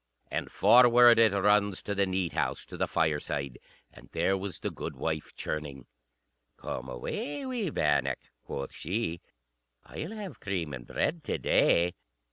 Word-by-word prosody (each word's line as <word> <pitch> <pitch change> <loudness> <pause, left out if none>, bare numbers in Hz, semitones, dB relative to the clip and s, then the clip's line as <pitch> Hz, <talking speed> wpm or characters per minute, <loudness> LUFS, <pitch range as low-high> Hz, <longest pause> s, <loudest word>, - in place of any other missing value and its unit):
And - - -3
forward 120 -1 +7
it 115 -2 +6
runs 100 0 +2
to 100 - -2
the 100 -1 +1
neat 95 -2 -1
house, - - -1
to - - -10
the - - 0
fireside; 75 -4 -1 0.3
and - - -15
there 90 +4 +2
was 95 0 -5
the - - -4
goodwife 80 -2 -4
churning. 70 -4 -5 0.7
"Come 65 +1 -5
away, 140 - -4
wee 245 -8 -2
bannock," 75 - +1 0.3
quoth 70 0 -5
she; 85 -1 -3 0.6
"I'll 160 - -6
have 210 -3 -7
cream 90 -7 -3
and 60 -2 -8
bread 165 -1 -1
to - - -1
day." 85 +1 +3
95 Hz, 145 wpm, -29 LUFS, 75-115 Hz, 0.7 s, forward